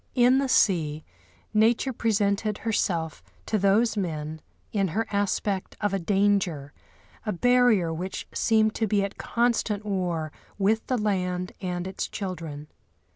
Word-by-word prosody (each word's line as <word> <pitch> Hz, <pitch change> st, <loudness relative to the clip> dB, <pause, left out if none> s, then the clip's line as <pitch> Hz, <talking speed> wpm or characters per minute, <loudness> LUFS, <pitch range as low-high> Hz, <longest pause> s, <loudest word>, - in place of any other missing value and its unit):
In 250 Hz, +1 st, +5 dB
the 275 Hz, -1 st, 0 dB
sea, 160 Hz, -10 st, +2 dB, 0.5 s
nature 225 Hz, +4 st, +3 dB
presented 210 Hz, -2 st, 0 dB
herself 170 Hz, -8 st, -1 dB, 0.2 s
to 215 Hz, -, 0 dB
those 205 Hz, +5 st, +3 dB
men 155 Hz, -5 st, -3 dB, 0.3 s
in 195 Hz, -2 st, +1 dB
her 220 Hz, +7 st, -1 dB
aspect 200 Hz, -1 st, -1 dB
of 205 Hz, -2 st, 0 dB
a 195 Hz, -, +1 dB
danger, 190 Hz, -6 st, +1 dB, 0.5 s
a 215 Hz, -, -1 dB
barrier 225 Hz, -4 st, +3 dB
which 180 Hz, +4 st, -5 dB
seemed 220 Hz, -1 st, +3 dB
to 220 Hz, -, 0 dB
be 205 Hz, 0 st, +2 dB
at 200 Hz, +1 st, -5 dB
constant 230 Hz, -3 st, 0 dB
war 175 Hz, -6 st, -2 dB, 0.3 s
with 210 Hz, +3 st, +1 dB
the 255 Hz, -, +1 dB
land 180 Hz, -4 st, -1 dB
and 180 Hz, -1 st, -3 dB
its 190 Hz, 0 st, -3 dB
children. 165 Hz, -7 st, -6 dB
200 Hz, 135 wpm, -26 LUFS, 180-220 Hz, 0.5 s, In